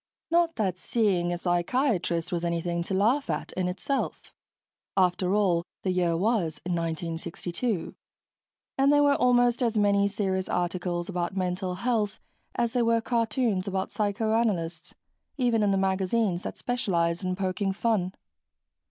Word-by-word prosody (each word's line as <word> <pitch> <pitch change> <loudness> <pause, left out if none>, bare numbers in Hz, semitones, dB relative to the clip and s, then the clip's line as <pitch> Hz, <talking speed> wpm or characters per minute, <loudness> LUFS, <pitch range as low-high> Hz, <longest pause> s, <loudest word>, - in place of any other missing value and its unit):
Not 335 -1 +3
that 190 -5 -1
seeing 190 -7 +1
a 175 - -1
psychiatrist 175 - 0
was 175 -1 -1
anything 170 0 -1
to 190 - -2
laugh 240 +9 +2
at, - - -2
in 185 -1 -1
itself. 195 +10 -3 0.6
After 185 +1 +2
all, 180 -5 +2 0.2
the 185 - +1
year 175 -2 +1
was 190 -5 0
1962, 170 +4 -3 0.9
and 275 +1 +5
there 290 0 +5
were 285 0 +5
almost 245 -1 +3
as 230 -3 +1
many 200 -1 +3
serious 190 -2 -1
articles 175 -1 -1
about 180 0 -3
mental 180 0 -1
health 210 0 -1 0.4
as 235 -1 +1
there 245 -1 +1
were 230 0 +3
cartoons 225 -4 0
about 190 0 -2
psychoanalysts, 205 -5 -1 0.4
even 240 -4 +2
in 205 - +3
the 195 - +2
magazines 190 0 +1
that - - -6
specialized 175 -8 0
in 185 0 -1
poking 195 +1 -1
fun. 195 -3 0
190 Hz, 140 wpm, -27 LUFS, 175-230 Hz, 0.9 s, and